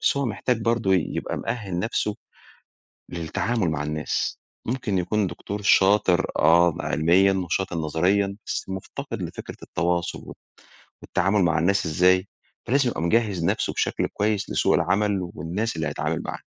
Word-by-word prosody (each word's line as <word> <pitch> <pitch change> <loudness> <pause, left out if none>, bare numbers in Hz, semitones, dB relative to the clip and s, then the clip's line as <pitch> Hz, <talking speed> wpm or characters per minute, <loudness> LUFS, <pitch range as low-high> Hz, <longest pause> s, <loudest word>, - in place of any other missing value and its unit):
بس - - +2
هو 140 -1 0
محتاج 115 +1 -1
برضو 115 -3 +1
يبقى 90 -4 -1
مؤهِّل 105 -7 -3
نفسه، 105 0 -1 1.0
للتعامل 90 +4 -1
مع 75 -2 -2
الناس، 75 0 -2 0.3
ممكن 115 -5 -1
يكون 100 +3 0
دكتور 100 +4 -6
شاطر 95 -2 +4
آه 85 +1 +5
م - - -6
علميًا 90 +5 +3
وشاطر 95 -1 -2
نظريًا 90 +6 +1
بس - - -3
مفتقد 95 0 -6
لفكرة - - -7
التواصل 85 +1 -2 0.7
والتعامل 95 +1 +1
مع 85 -3 +2
الناس 100 +3 +2
إزاي؟ 90 +4 +3 0.4
فلازم 130 +1 +2
يبقى 100 - -4
مجهز 95 -1 +1
نفسه - - 0
بشكل - - 0
كويّس 105 -1 -1
لسوق - - +2
العمل 100 -3 +1
والناس 100 +7 -3
اللي 80 -1 -2
هيتعامل - - -2
معاها. - - -6
95 Hz, 140 wpm, -24 LUFS, 85-105 Hz, 1.0 s, آه